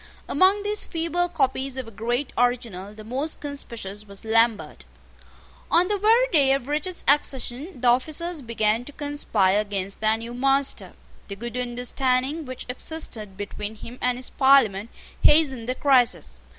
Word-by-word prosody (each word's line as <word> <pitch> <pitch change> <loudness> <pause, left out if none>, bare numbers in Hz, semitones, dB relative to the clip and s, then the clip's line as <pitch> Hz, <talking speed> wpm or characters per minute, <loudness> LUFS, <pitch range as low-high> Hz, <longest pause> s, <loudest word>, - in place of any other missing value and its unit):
Among 380 +6 +3
these 420 +1 +2
feeble 340 +1 -1
copies 270 -4 -1
of 260 -3 -5
a - - -10
great 240 +6 -2
original 230 -6 -1
the 215 0 -12
most 265 +8 -3
conspicuous 225 -8 -7
was 200 +2 -10
Lambert. 220 - +1 0.8
On 355 +3 +3
the 415 -1 0
very 455 +5 +4
day 275 -5 +4
of 275 -2 -2
Richard's 305 +5 -3
accession 275 +2 +1
the 245 - 0
officers 310 +7 +1
began 230 -1 0
to 290 - -9
conspire 225 -10 +1
against 200 -1 -4
their 220 0 +3
new 230 +1 -8
master. 270 +2 +1 0.3
The 200 - -6
good 235 +3 -7
understanding 255 +4 -1
which 255 -1 -7
existed 245 -7 -3
between 205 +1 -5
him 235 +3 -11
and 250 0 +1
his 255 - -5
Parliament 235 -7 +4 0.3
hastened 265 -6 +4
the 255 - 0
crisis. 250 - +2
250 Hz, 150 wpm, -24 LUFS, 220-290 Hz, 0.8 s, very